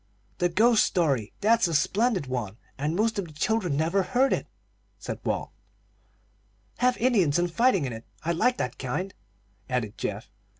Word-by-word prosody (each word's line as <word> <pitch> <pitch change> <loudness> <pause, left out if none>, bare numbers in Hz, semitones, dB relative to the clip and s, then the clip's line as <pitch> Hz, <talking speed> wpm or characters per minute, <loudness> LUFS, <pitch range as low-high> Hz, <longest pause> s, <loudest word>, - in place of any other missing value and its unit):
"The 175 - +2
ghost 220 +5 +4
story; 140 - 0
that's 225 -1 +4
a 165 - -2
splendid 200 - +1
one, 120 -6 -4 0.2
and 150 +4 -2
most 220 +2 +1
of 190 - -3
the 155 - -14
children 180 -1 0
never 165 +6 +2
heard 255 +8 +2
it," - - -2 0.5
said - - -6
Walt. - - -2 1.3
"Have 250 0 +3
Indians 200 - +3
and 175 -1 0
fighting 230 - +3
in 125 - -4
it. 115 +1 -9 0.2
I 170 - 0
like 245 +9 +2
that 125 - -3
kind," 180 +10 -3 0.6
added 120 -5 -2
Geoff. 105 +2 -4
175 Hz, 165 wpm, -26 LUFS, 140-225 Hz, 1.3 s, ghost